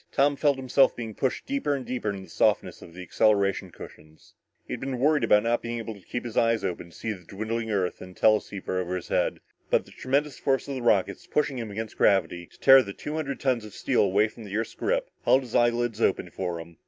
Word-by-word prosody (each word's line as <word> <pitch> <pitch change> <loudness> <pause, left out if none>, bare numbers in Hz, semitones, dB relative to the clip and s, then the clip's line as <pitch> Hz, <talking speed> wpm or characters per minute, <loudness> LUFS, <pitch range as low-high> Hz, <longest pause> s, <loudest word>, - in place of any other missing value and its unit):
Tom 145 +1 +3
felt 140 -1 +2
himself 130 +1 +3
being 115 -2 -6
pushed 130 +4 -2
deeper 270 - -1
and 130 -2 -5
deeper 125 -4 -3
into 100 -1 -5
the - - -13
softness - - +1
of 85 - -13
the 90 - -7
acceleration 100 -1 +2
cushions. 75 -2 -14 0.3
He - - -6
had - - -4
been 135 -1 -3
worried 145 +1 +2
about 105 -2 +4
not 120 +1 +1
being 120 0 -4
able 115 -1 -5
to 100 - -14
keep 120 +7 -5
his 115 - -6
eyes 115 -2 +2
open 85 -1 -4
to - - -18
see 110 - -3
the 90 -3 -12
dwindling 110 +5 -4
Earth 95 -4 -1
in 90 0 -10
the - - -20
teleceiver 100 -3 +1
over 90 0 -3
his 90 - -6
head, - - 0 0.3
but - - +2
the - - -17
tremendous 140 +2 -1
force 135 0 0
of 140 - -4
the 130 - -4
rockets 100 -5 +1
pushing 140 -3 0
him 115 -2 -5
against 110 +2 -6
gravity 90 -3 +2
to - - -23
tear 135 0 +8
the 100 -5 -6
two 150 - -6
hundred 150 -3 -3
tons 130 -4 0
of 105 -2 -11
steel - - +1
away 100 +2 +3
from 110 +1 -12
the 100 0 -4
Earth's 110 - -3
grip - - -1 0.2
held 130 - +4
his 120 - -11
eyelids 120 -1 +1
open 90 -4 +1
for 90 -3 -3
him. 85 0 -11
115 Hz, 245 wpm, -26 LUFS, 100-130 Hz, 0.3 s, tear